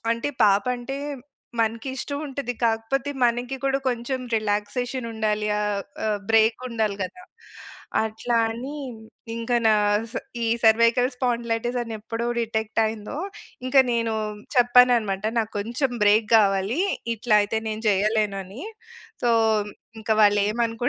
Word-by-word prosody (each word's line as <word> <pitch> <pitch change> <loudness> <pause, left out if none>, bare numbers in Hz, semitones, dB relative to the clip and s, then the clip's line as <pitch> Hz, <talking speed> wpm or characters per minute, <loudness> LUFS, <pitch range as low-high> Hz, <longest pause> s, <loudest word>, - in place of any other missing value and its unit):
అంటే, 230 +4 -2 0.2
పాపంటే 245 +6 +1 0.6
మనకిష్టవుంటది. 265 +3 -3
కాకపోతే, 230 +5 -1
మనకి 245 +2 0
కూడా 270 0 +2
కొంచెం 250 +2 -2 0.2
రిలాక్సేషనుండాలి. 215 0 -1
ఆహ్, 205 -1 -1 0.2
ఆహ్, 210 -1 0
బ్రేకుండాలి 225 -1 +2
గదా! 190 - -7 0.8
అట్లా 220 +2 -2 0.2
అని, 250 +6 -6 0.6
ఇంక 230 +1 -3
నాస్ 210 +1 +2 0.3
ఈ - - 0 0.2
సర్వైకల్ 230 +3 +5
స్పాండిలైటిస్ 240 -1 -1
అని 230 -1 -6
ఎప్పుడో 230 +2 -4
డిటెక్టయిందో, 220 0 -1 0.5
ఇంక 255 - -1
నేనూ 230 -1 0 0.4
చెప్పాననమాట, 245 -5 +4
నాకు 220 -1 -1
కొంచెం 240 +6 -1
బ్రేక్ 210 +1 +4
గావాలీ. 200 - +2 0.3
ఇట్లా 225 0 0
అయితే 210 +2 -1
నేను 215 0 -4
జెయ్యలేను 210 0 +1
అని. 195 +8 -10 0.6
సో, 240 - +3 0.7
ఇంక 220 - -7
వాళ్ళేమనుకుంటే 225 +3 +2
225 Hz, 105 wpm, -24 LUFS, 215-245 Hz, 0.8 s, సర్వైకల్